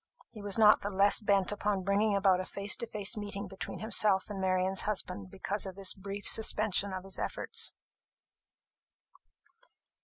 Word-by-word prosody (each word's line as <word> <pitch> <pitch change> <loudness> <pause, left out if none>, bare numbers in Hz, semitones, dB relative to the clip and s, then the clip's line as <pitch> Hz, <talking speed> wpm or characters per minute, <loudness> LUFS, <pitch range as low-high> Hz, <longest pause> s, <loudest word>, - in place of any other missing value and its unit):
He 215 - -11
was 205 0 -2
not 215 -1 +6
the 205 - -4
less 200 +1 +4
bent 200 -3 +1
upon 205 -2 -1
bringing 200 +2 +1
about 195 -2 +3
a 185 - -3
face 200 +2 -1
to 235 - -4
face 210 +1 -2
meeting 205 -1 -5
between 190 0 -7
himself 210 -2 +1
and 195 -2 -5
Marian's 185 0 +1
husband 105 - -3
because 200 - -3
of 190 - -8
this 195 -1 0
brief 200 +1 -5
suspension 210 -2 +2
of 185 -1 -5
his 195 0 -4
efforts. - - -1
200 Hz, 160 wpm, -31 LUFS, 190-210 Hz, -, not